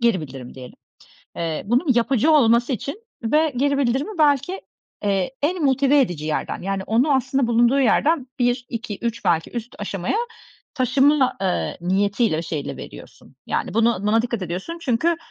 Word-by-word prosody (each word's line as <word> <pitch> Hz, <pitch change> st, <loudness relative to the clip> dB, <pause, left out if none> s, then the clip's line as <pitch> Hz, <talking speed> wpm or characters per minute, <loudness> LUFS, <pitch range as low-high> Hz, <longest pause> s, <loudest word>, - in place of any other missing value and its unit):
geri 235 Hz, -7 st, +2 dB
bildirim 130 Hz, -4 st, -9 dB
diyelim. 130 Hz, -1 st, -11 dB, 0.6 s
Eee, 165 Hz, -2 st, -3 dB
bunun 250 Hz, -, +2 dB
yapıcı 245 Hz, +5 st, +2 dB
olması 240 Hz, -2 st, +4 dB
için 280 Hz, -, -5 dB, 0.2 s
ve 300 Hz, +6 st, +2 dB
geri 280 Hz, +1 st, +1 dB
bildirimi 275 Hz, -, -1 dB
belki, 295 Hz, +5 st, +2 dB, 0.4 s
eee, 195 Hz, +1 st, 0 dB
en 335 Hz, +3 st, 0 dB
motive 275 Hz, +1 st, +3 dB
edici 175 Hz, -, -2 dB
yerden, 155 Hz, -1 st, -3 dB
yani, 195 Hz, 0 st, -2 dB
onu 245 Hz, +8 st, +2 dB
aslında 265 Hz, -1 st, 0 dB
bulunduğu 240 Hz, +3 st, +3 dB
yerden 275 Hz, +3 st, +2 dB
1-2-3 235 Hz, -3 st, -2 dB
belki 165 Hz, -1 st, +1 dB
üst 235 Hz, 0 st, -6 dB
aşamaya 195 Hz, -, -2 dB, 0.6 s
taşıma, 270 Hz, +1 st, +3 dB
eee, 185 Hz, -2 st, -1 dB
niyetiyle, 200 Hz, 0 st, +1 dB
o -, -, -2 dB
şeyiyle 160 Hz, -3 st, -5 dB
veriyorsun. -, -, -12 dB
Yani, -, -, -2 dB
bunu 230 Hz, -1 st, +3 dB
buna 215 Hz, +2 st, +2 dB
dikkat 235 Hz, -3 st, -3 dB
ediyorsun 185 Hz, -, -5 dB
çünkü, 305 Hz, +6 st, +1 dB
235 Hz, 150 wpm, -22 LUFS, 200-275 Hz, 0.6 s, olması